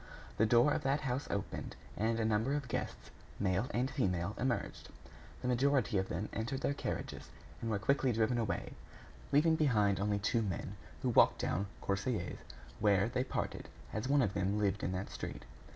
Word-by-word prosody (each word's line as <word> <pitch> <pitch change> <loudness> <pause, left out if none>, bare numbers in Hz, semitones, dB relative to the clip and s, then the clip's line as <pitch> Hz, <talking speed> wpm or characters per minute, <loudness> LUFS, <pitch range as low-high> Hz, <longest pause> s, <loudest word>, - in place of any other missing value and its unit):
The 110 - +4
door 120 +6 +5
of - - 0
that 140 +1 +1
house 130 0 -2
opened, 100 - -3 0.2
and 115 +2 0
a 110 - +1
number 110 +6 +2
of 145 -3 -2
guests, - - -4 0.3
male 95 +3 +1
and 125 -2 0
female, 95 - 0
emerged. 125 -1 -2 0.5
The - - -1
majority 125 -4 +2
of 95 - -2
them 95 +6 -2
entered 120 +4 -2
their 140 - +1
carriages - - -4 0.3
and 115 - -2
were 110 - +1
quickly 135 +4 +2
driven 115 +2 +2
away, 110 -3 -2 0.6
leaving 155 +3 +5
behind 105 -11 +3
only 100 +1 +1
two 105 +3 +1
men 95 -6 -3 0.3
who - - +2
walked - - +5
down 100 +4 -1
Courcelles, 100 -1 -1 0.4
where 100 0 +3
they 125 +1 0
parted, - - -3 0.2
as 110 +4 -2
one 140 -1 +5
of 100 - 0
them 100 +1 0
lived 100 0 +1
in - - -1
that 95 +2 -4
street. - - -6
110 Hz, 180 wpm, -34 LUFS, 100-130 Hz, 0.6 s, door